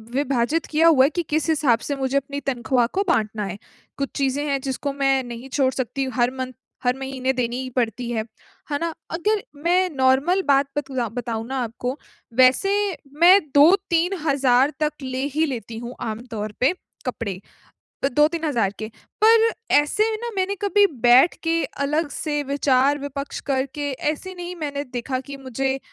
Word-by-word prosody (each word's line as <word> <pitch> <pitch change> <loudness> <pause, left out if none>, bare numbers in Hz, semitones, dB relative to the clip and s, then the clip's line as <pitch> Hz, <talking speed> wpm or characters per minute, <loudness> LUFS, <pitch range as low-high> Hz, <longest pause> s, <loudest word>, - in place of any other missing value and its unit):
विभाजित 275 +3 0
किया 320 +2 +3
हुआ 275 -5 +6
है - - +3
कि 345 - 0
किस 310 +1 0
हिसाब 275 -7 +3
से 285 - 0
मुझे 270 0 0
अपनी 280 +1 -3
तनख्वाह 245 -1 +1
को 395 - +3
बाँटना 215 -8 0
है। 195 +1 -5 0.4
कुछ 275 -1 -2
चीज़ें 275 +1 0
हैं, 275 -1 +1
जिसको 275 +1 -3
मैं 270 -1 +2
नहीं 240 +2 -8
छोड़ 260 -1 +2
सकती, 265 +1 -2
हर 245 0 +2
मन्थ, 255 -1 -4 0.3
हर 250 +1 +1
महीने 265 -1 -2
देनी 250 0 -2
ही 255 - -5
पड़ती 235 0 -1
है। 220 -2 -1 0.5
है 285 - 0
ना? 335 -1 -2 0.2
अगर 410 +5 0 0.2
मैं 365 +2 +3
नॉर्मल 270 +8 +3
बात 275 0 +4
बतुँदा 260 -5 -2
बताऊँ 225 -2 -4
ना 265 0 -3
आपको, 245 +4 -4 0.4
वैसे 255 - +4 0.5
मैं 365 +3 +9 0.2
2-3 350 +3 +4
हज़ार 275 0 +3
तक 300 -1 +1
ले 260 0 -3
ही 320 +1 +3
लेती 230 -5 -5
हूँ 240 +2 -7
आम 225 +2 -4
तौर 210 -1 -4
पे, 265 +8 +3 0.3
कपड़े 225 -7 -4 0.6
अ, - - +4
2-3 305 +4 +2
हज़ार 235 -10 +1
के। 215 - -4 0.4
पर 455 0 +6 0.3
ऐसे 295 +9 +3
में 435 - -2
ना, 475 - -3
मैंने 385 +1 0
कभी 410 0 +4 0.2
बैठ 250 +7 +6
के, 330 0 +1
अलग 295 +2 -1
से 295 -2 -2
विचार-विपक्ष 280 0 0
करके, 275 +2 -1
ऐसे 305 +7 -3
नहीं 355 0 -6
मैंने 285 -4 -3
देखा 255 0 -4
कि 280 -1 -7
मुझे 270 +1 -2
275 Hz, 175 wpm, -23 LUFS, 250-310 Hz, 0.6 s, मैं